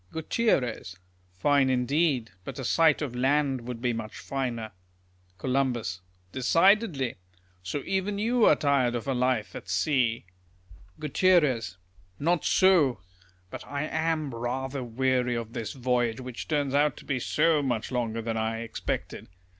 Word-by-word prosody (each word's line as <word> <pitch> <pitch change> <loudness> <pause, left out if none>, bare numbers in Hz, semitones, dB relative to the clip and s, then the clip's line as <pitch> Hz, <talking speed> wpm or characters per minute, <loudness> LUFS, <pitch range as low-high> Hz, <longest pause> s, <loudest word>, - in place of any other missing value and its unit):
Gutierrez. 150 - -1 0.3
Fine 135 +9 +2
indeed; 130 -1 +1
but - - -7
a 135 - -5
sight 155 +1 +3
of 125 -4 -5
land 135 -1 +1
would 120 -1 -6
be 120 -1 +1
much 110 -2 -6
finer. 120 -5 -4 0.7
Col. 130 +2 0 0.6
Decidedly. 165 - +2 0.4
So 90 +10 -4
even 195 +1 -1
you 230 +2 +2
are - - +6
tired 140 -5 +1
of 120 +2 -4
a 135 - +1
life 125 -3 0
at - - -8
sea. 115 - +1 0.7
Gut. 150 -5 +3 0.5
Not 165 +2 +1
so. 170 - +4 0.5
But - - -7
I 140 +1 -3
am 160 -2 -1
rather 130 +3 -3
weary 125 +1 0
of 115 -1 -5
this 110 -2 -4
voyage, 120 -3 0
wliich 125 -2 -7
turns 145 -3 0
out 145 0 +2
to - - -12
be 140 -3 -1
so 155 +4 +2
much 125 -5 -2
longer 115 -2 -2
than 115 0 -2
I 110 +1 -1
expected. 115 - -4
130 Hz, 140 wpm, -27 LUFS, 120-150 Hz, 0.7 s, are